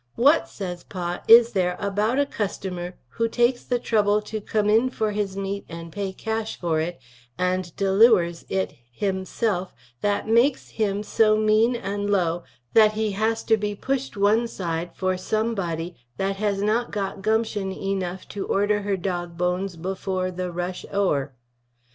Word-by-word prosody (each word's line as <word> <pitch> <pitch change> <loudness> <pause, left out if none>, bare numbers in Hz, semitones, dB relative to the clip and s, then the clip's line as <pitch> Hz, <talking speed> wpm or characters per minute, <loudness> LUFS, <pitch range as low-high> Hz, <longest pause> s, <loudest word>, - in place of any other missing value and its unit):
What 285 +7 +4
says 180 -3 -6
Pa 175 -2 -4
is 235 +1 +8
there 180 -4 0
about 210 +4 0
a 285 - +3
cusstamer 190 -7 -4 0.2
who 230 - 0
takes 240 +2 +2
the 245 - 0
trubble 210 -3 +2
to 215 0 -5
come 215 +4 +2
for 220 -4 -1
his 205 -2 -2
meet 195 0 -3
& 165 0 -10
pay 200 +1 -3
cash 220 +3 -3
for 165 -3 0
it 170 0 -3 0.2
& 120 +6 -32
deliwers 185 0 +3
it 190 0 -1 0.2
him 190 +6 -2
self 190 -3 -1 0.3
that 205 0 0
maiks 235 +5 +3
him 205 -2 -1
so 215 0 +3
Meen 215 +3 +3 0.3
& - - -2
Lo 175 -3 +1 0.3
that 215 -1 +6
he 215 0 0
hass 220 +3 0
to 220 - +3
be 210 -1 -2
pushed 270 +1 -2
one 215 +4 +3
side 170 -5 -3
for 185 -1 0
some 220 +5 0
body 170 -3 -3 0.2
that 195 0 -1
has 200 -1 0
not 225 +3 +1
got 195 -1 -3
Gumpshun 215 -2 0
enoughf 190 -1 -3
to 200 - -4
order 205 +1 +2
her 200 -1 -1
dog 175 -2 -3
bones 180 +1 -1
before 185 +1 -2
the 180 0 -4
rush 175 +1 -4
our? 145 -9 0
200 Hz, 165 wpm, -24 LUFS, 180-220 Hz, 0.3 s, is